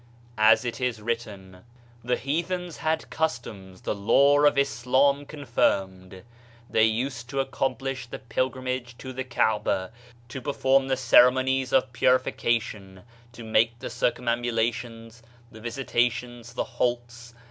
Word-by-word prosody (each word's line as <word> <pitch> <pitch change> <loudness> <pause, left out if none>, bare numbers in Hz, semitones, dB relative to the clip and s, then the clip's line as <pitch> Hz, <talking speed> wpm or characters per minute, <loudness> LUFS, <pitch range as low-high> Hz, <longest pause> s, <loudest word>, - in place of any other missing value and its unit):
As 110 +3 +5
it 120 +2 -4
is 125 -3 -1
written: 105 -5 -5 0.4
"The 125 +1 +1
heathens 170 +5 -3
had 160 0 -2
customs 110 -11 -4
the - - -2
Law 140 +8 +4
of 145 - +4
Islam 140 +1 +2
confirmed: 95 -9 -1 0.4
they 110 -2 +3
used 120 +2 -2
to 135 - -8
accom 135 0 -1
plish 135 -1 -5
the - - -7
pilgrimage 130 0 -3
to 130 -1 -8
the 130 +1 -4
Kaaba, 105 -5 0 0.4
to 130 - -6
perform 135 -1 +2
the 130 -1 0
ceremonies 130 +1 +4
of 130 -2 +2
purification, 115 -6 0 0.3
to 120 - -10
make 115 +1 +2
the - - -7
circum 125 0 -1
ambulations, 115 -1 -2 0.3
the 110 - -13
visitations, 120 0 -2
the - - 0
halts 120 -1 -3
120 Hz, 130 wpm, -26 LUFS, 115-130 Hz, 0.4 s, As